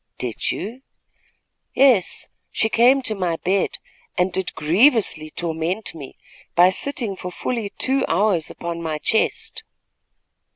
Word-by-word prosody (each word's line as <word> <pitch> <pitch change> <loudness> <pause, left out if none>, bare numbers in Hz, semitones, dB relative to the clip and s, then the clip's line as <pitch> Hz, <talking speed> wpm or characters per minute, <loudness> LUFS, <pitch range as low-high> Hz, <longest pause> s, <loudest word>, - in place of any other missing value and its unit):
"Did 120 -4 -2
you?" 235 +6 -6 0.9
"Yes, 255 -9 +4 0.3
she 220 - +1
came 255 +4 +4
to 220 - 0
my 180 -5 -1
bed 190 +4 0 0.4
and 180 0 +1
did 190 -1 -3
grievously 180 - +3
torment 170 +6 -3
me, 145 -5 -10 0.4
by 180 +2 +6
sitting 235 -2 -1
for 180 -1 -7
fully 225 +2 -3
two 270 +1 +2
hours 180 -2 +1
upon 170 0 -5
my 160 -2 -2
chest." 220 +8 0
190 Hz, 125 wpm, -22 LUFS, 170-225 Hz, 0.9 s, by